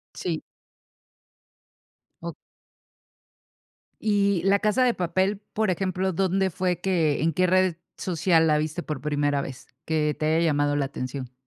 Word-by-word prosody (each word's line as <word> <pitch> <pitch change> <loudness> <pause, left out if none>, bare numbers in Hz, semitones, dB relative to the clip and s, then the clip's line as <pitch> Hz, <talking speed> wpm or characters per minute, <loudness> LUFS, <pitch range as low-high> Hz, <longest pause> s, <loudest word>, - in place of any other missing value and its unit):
Sí. - - -3 1.8
Oh - - -5 1.7
Y, 200 -4 +2
La 200 +1 +4
Casa 215 +5 +2
de 245 - +3
Papel, 185 +3 0
por 215 -3 +1
ejemplo, 185 +1 -1
¿dónde 190 +2 +1
fue 180 0 -1
que, 165 -7 +1
en 165 +1 +2
qué 185 +4 +2
red 185 -2 +3 0.2
social 170 -2 +2
la 150 -1 +3
viste 155 +3 -2
por 150 -4 -5
primera 145 0 0
vez, 130 -2 -8 0.2
que 150 -2 0
te 155 - -1
haya 165 - +2
llamado 145 -1 +1
la 140 -2 +1
atención? 130 -1 -6
170 Hz, 140 wpm, -25 LUFS, 150-190 Hz, 1.8 s, La